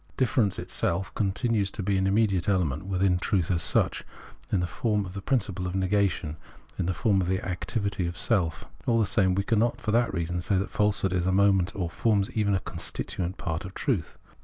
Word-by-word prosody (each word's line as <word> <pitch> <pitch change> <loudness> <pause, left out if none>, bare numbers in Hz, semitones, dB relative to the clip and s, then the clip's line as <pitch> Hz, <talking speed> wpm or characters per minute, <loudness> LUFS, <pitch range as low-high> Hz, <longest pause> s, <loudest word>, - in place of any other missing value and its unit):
Difference 115 -6 +2
itself 90 +2 -2
continues 105 0 0
to 105 - -5
be 100 +1 +1
an 95 0 +2
immediate 100 -2 +2
element 90 -3 0
within 95 -1 +2
truth 95 -2 0
as 85 -2 +2
such, - - +2 0.5
in 100 - +2
the 90 - 0
form 105 +2 -1
of 90 - -8
the 100 - -5
principle 95 -6 -1
of 90 - -4
negation, 95 -5 0 0.4
in - - 0
the 95 - +1
form 100 -1 +2
of 90 - -1
the 95 +1 -1
activity 95 0 -2
of 85 - -5
Self. 85 -8 0 0.2
All 115 -2 +3
the 110 - +3
same, 95 -3 +2
we 100 - +1
cannot 115 +1 +1
for 110 - -2
that 115 +1 +2
reason 85 -1 -2
say 95 +3 +1
that 95 +1 -2
falsehood 105 -3 +1
is 90 0 0
a - - +3
moment 95 -1 +3
or 90 -4 -1
forms 100 +2 +1
even 105 -2 +1
a - - +1
constituent 90 +1 -4
part 80 -4 -3
of 95 +1 -9
truth. 110 - -1
95 Hz, 210 wpm, -27 LUFS, 90-105 Hz, 0.5 s, All